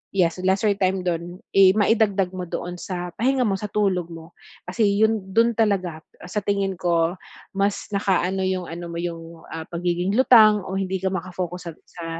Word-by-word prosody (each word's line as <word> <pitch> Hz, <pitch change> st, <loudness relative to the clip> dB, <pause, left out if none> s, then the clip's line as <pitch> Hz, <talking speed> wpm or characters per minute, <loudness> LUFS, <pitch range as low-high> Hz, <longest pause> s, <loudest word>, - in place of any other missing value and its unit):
yes, 175 Hz, -2 st, +2 dB
lesser 195 Hz, +3 st, +2 dB
time 185 Hz, -1 st, 0 dB
dun 175 Hz, +1 st, -3 dB, 0.2 s
eh 195 Hz, -1 st, +7 dB
maidagdag 205 Hz, -3 st, +2 dB
mo 180 Hz, -1 st, -5 dB
doon 175 Hz, 0 st, -5 dB
sa 180 Hz, -2 st, -5 dB
pahinga 255 Hz, +1 st, +2 dB
mo 200 Hz, -, +1 dB
sa 210 Hz, +1 st, -6 dB
tulog 185 Hz, -5 st, 0 dB
mo. 165 Hz, 0 st, -11 dB, 0.3 s
Kasi 200 Hz, +5 st, 0 dB, 0.2 s
yun 220 Hz, -2 st, 0 dB
dun 230 Hz, +1 st, +4 dB
talaga, 185 Hz, -7 st, 0 dB, 0.2 s
ah, -, -, -10 dB
sa 210 Hz, +3 st, -2 dB
tingin 200 Hz, -1 st, 0 dB
ko 170 Hz, -2 st, +1 dB, 0.4 s
mas 200 Hz, +1 st, -1 dB
nakaano 190 Hz, -1 st, +1 dB
yung 185 Hz, -1 st, -1 dB
ano 170 Hz, +1 st, -7 dB
mo 170 Hz, -, -6 dB
yung, 165 Hz, -1 st, -7 dB
ah, 160 Hz, 0 st, -5 dB
pagiging 175 Hz, +2 st, -1 dB
lutang 215 Hz, -5 st, +6 dB
o 190 Hz, -, -6 dB
hindi 190 Hz, 0 st, -1 dB
ka 190 Hz, -, 0 dB
maka-focus 180 Hz, -1 st, -5 dB
sat -, -, -26 dB
sa 170 Hz, -2 st, -10 dB
185 Hz, 180 wpm, -23 LUFS, 175-200 Hz, 0.4 s, eh